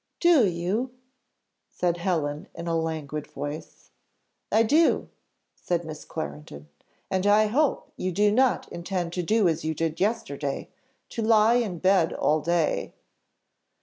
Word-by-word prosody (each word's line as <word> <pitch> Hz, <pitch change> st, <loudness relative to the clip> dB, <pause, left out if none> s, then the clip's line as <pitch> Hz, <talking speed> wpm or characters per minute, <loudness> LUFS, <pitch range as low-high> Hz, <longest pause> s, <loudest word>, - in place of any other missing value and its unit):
"Do 330 Hz, -, +5 dB
you?" 195 Hz, +9 st, -2 dB, 0.7 s
said 175 Hz, -1 st, -1 dB
Helen 155 Hz, -5 st, -2 dB
in 170 Hz, -, -6 dB
a 165 Hz, -1 st, -1 dB
languid 155 Hz, -2 st, -3 dB
voice. 145 Hz, +2 st, -8 dB, 0.6 s
"I 225 Hz, -, +5 dB
do," 310 Hz, +9 st, +3 dB, 0.4 s
said 175 Hz, -1 st, -2 dB
Miss 155 Hz, -1 st, -8 dB
Clarendon; 75 Hz, 0 st, -7 dB, 0.4 s
"and 190 Hz, +1 st, +1 dB
I 210 Hz, +1 st, +5 dB
hope 275 Hz, +7 st, 0 dB
you 185 Hz, -, -2 dB
do 205 Hz, +3 st, +3 dB
not 255 Hz, +3 st, +2 dB
intend 175 Hz, -1 st, -3 dB
to 180 Hz, -, -1 dB
do 210 Hz, +3 st, +2 dB
as 165 Hz, -1 st, 0 dB
you 160 Hz, 0 st, -2 dB
did 165 Hz, +1 st, -2 dB
yesterday, 150 Hz, -10 st, -2 dB, 0.4 s
to 230 Hz, -, -4 dB
lie 220 Hz, +1 st, +5 dB
in 210 Hz, -8 st, -1 dB
bed 185 Hz, -1 st, +3 dB
all 155 Hz, +1 st, +1 dB
day." 170 Hz, +1 st, 0 dB
175 Hz, 140 wpm, -26 LUFS, 160-215 Hz, 0.7 s, Do